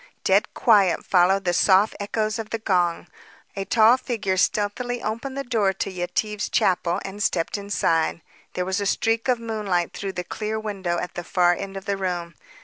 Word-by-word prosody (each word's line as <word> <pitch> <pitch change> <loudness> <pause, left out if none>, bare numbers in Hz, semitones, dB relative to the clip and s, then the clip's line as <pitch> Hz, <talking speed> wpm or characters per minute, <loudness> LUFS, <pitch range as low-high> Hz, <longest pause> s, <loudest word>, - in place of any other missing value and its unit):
Dead - - +3
quiet 205 -7 +3
followed 190 +2 +3
the 175 - +1
soft 195 +4 +4
echoes 215 +2 -2
of 220 -1 -5
the 225 - -2
gong. 180 -6 0 0.5
A 195 -1 -3
tall 225 +3 +5
figure 220 -7 -2
stealthily 215 +6 0
opened 230 +6 -4
the 275 - -2
door 220 -7 +1
to 195 - -3
Yetive's 185 +4 -2
chapel 180 -1 +1
and 195 +1 -7
stepped 165 -4 0
inside. 170 -5 0 0.3
There 180 - -2
was 190 +2 -1
a 200 - -1
streak 225 +4 0
of 250 -2 +2
moonlight 210 -7 -2
through 195 -1 -5
the 180 - -4
clear 215 +3 -4
window 195 -5 -3
at 180 - -4
the 175 - -5
far 175 0 +3
end 195 +2 -6
of 195 - -8
the 200 -1 -1
room. 175 -3 -3
200 Hz, 185 wpm, -24 LUFS, 180-220 Hz, 0.5 s, tall